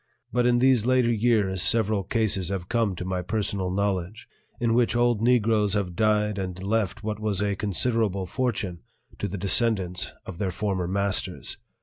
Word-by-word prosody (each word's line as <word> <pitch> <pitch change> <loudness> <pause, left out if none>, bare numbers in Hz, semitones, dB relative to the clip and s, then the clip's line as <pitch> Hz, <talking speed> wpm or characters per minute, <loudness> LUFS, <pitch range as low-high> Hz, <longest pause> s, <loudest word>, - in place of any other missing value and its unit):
But 125 0 +2
in 120 0 +3
these 130 -2 +4
later 125 -1 +3
years 105 -5 +1
several 105 +1 +2
cases 100 -3 +1
have 95 -3 -4
come 115 -4 0
to 90 - -6
my 95 0 -2
personal 100 -1 -2
knowledge 95 +1 -2 0.3
in 115 -1 +1
which 120 0 +2
old 120 -2 +2
Negroes 110 -4 +2
have 95 -4 -2
died 105 0 +1
and 95 -1 -5
left 110 0 -1
what 105 -1 -3
was 105 -3 -1
a 100 -1 0
considerable 100 0 0
fortune 100 -6 -2 0.4
to 105 - -2
the 100 +1 -5
descendants 95 -2 +1
of 85 - -8
their 100 - -1
former 95 -1 -2
masters. 100 +1 -1
105 Hz, 165 wpm, -25 LUFS, 95-115 Hz, 0.4 s, these